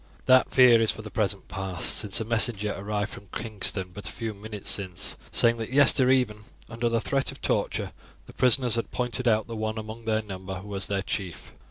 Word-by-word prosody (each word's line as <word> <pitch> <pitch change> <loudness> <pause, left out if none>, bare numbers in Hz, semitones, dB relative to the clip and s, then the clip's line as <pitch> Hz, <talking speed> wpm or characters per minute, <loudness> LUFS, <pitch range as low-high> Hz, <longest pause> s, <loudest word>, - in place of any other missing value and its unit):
"That 130 0 +5
fear 125 -3 +6
is 110 - +2
for 110 - -1
the 105 - -8
present 100 -2 -1
past, 95 -3 -3
since 100 -3 -1
a 110 - -3
messenger 110 -2 +1
arrived 105 +1 -3
from 100 0 -11
Kingston 100 -4 -2
but 105 - -7
a - - -4
few 115 -2 -5
minutes 105 0 -9
since, 95 -3 -2 0.2
saying 115 0 +3
that 115 +1 -5
yester 130 -2 +6
even, 125 -5 +2 0.3
under 115 +1 -2
the 115 0 +1
threat 135 +3 -1
of - - -12
torture, - - -1 0.3
the - - -14
prisoners 125 -1 +3
had 115 -1 -1
pointed 125 0 -2
out 110 -2 +3
the 115 - -7
one 110 0 -3
among 110 +1 -7
their 110 0 0
number 95 -2 -7
who 100 +3 -9
was 100 -1 -2
their 100 -1 -1
chief. 95 -3 -5
110 Hz, 210 wpm, -26 LUFS, 100-115 Hz, 0.3 s, fear